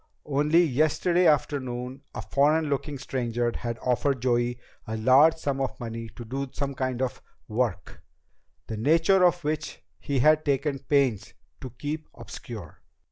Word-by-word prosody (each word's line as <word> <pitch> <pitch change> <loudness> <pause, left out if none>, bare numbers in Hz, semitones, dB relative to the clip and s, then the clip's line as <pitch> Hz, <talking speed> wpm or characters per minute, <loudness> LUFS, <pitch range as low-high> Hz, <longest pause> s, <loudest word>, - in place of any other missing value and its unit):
Only 150 +4 +3
yesterday 155 +4 +2
afternoon 130 -3 -1
a - - -4
foreign 150 +2 +2
looking 140 +1 -2
stranger 120 -3 -2
had 115 -1 -4
offered 125 0 0
Joey 120 -1 +1 0.3
a 110 0 -3
large 135 +8 +6
sum 140 -4 -2
of 135 - -3
money 115 -1 -6
to 120 - -8
do 135 +3 -4
some 140 -1 -3
kind 130 -1 -2
of 130 - -3 0.3
"work," 110 -5 -2 0.6
the 110 - -5
nature 165 - +4
of 175 -1 +3
which 150 0 -3 0.2
he 140 - -2
had 155 +4 +4
taken 140 0 0
pains 135 -8 0 0.2
to 130 - -7
keep 150 +6 -5
obscure! - - -9
135 Hz, 145 wpm, -26 LUFS, 120-150 Hz, 0.6 s, large